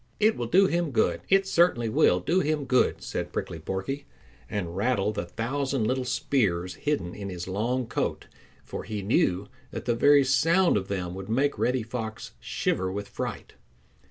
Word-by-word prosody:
"It 215 +1 +4
will 120 - -3
do 190 +9 +5
him 175 -3 0
good. 125 - +1
It 195 0 +4
certainly 170 -11 +3
will 90 -4 +3
do 175 - +2
him 150 -3 0
good," 130 -1 +2
said - - -4
Prickly 80 - -4
Porky, 95 - -4 0.4
and 90 -5 -3
rattled 105 0 +1
the 85 - -3
thousand 130 +4 -1
little 130 +2 0
spears 90 -10 0
hidden 95 -9 -2
in 100 -1 -6
his 90 -1 -6
long 120 +7 -1
coat, 115 - -2 0.4
for - - -6
he 105 -2 -4
knew 95 -1 +1 0.2
that - - -6
the 120 - +2
very 140 +4 +5
sound 165 +8 +3
of 95 -2 -1
them 90 -3 -3
would 95 +2 -7
make 140 +5 +1
Reddy 125 -1 +1
Fox 115 -1 -5
shiver 95 0 -1
with 100 +1 -5
fright. - - -5
115 Hz, 175 wpm, -27 LUFS, 95-140 Hz, 0.4 s, do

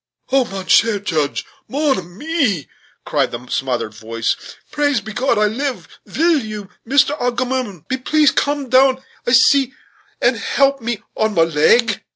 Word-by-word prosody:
"Oh! 265 -1 +3
mon 195 -3 -7
cher 225 +2 +4
Juge! 160 -7 -2 0.2
mon 285 0 +1
ami!" 205 - -2 0.4
cried - - 0
a 125 +1 -10
smothered 120 -5 -2
voice, 115 +1 -2 0.4
"praise 290 -4 +1
be 220 +1 -9
God, 245 0 +1
I 210 - +3
live; 260 +5 -3 0.2
vill 330 -1 +2
you, 210 -3 -7
Mister 275 +3 +3
Agamemnon, 245 - -2
be 260 - -1
pleas 300 +2 +3
come 285 -1 -1
down 260 +1 +3 0.2
ici, 265 +2 +4 0.4
and - - +2
help 275 -1 +1
me 230 -2 -3
on 220 -1 0
my 165 - +5
leg?" 185 +8 +2
240 Hz, 150 wpm, -18 LUFS, 190-275 Hz, 0.4 s, my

